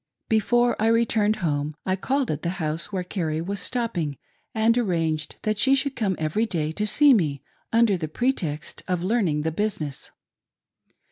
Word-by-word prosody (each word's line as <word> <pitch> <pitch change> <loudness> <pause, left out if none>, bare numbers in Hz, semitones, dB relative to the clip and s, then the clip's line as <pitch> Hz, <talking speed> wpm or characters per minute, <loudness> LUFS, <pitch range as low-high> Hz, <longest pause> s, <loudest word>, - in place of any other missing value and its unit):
Before 240 +2 +3
I 220 - +3
returned 225 -2 +2
home, 145 0 -1
I 185 - +1
called 265 - -1
at 150 - -3
the 175 +3 -3
house 160 +2 -2
where 185 -2 -2
Carrie 165 -4 -2
was 195 +4 -3
stopping, 180 - -2 0.3
and 225 +1 +2
arranged 165 -9 -1
that 215 -1 -1
she 270 0 +5
should 275 0 -1
come 200 -5 0
every 160 +9 0
day 155 -6 -1
to 210 +6 -2
see 285 +7 +6
me, 145 - 0 0.3
under 225 -5 +3
pretext 165 - -2
of 180 -1 -1
learning 185 -8 +1
the 160 - 0
business. 160 -6 -3
190 Hz, 160 wpm, -24 LUFS, 160-230 Hz, 0.3 s, see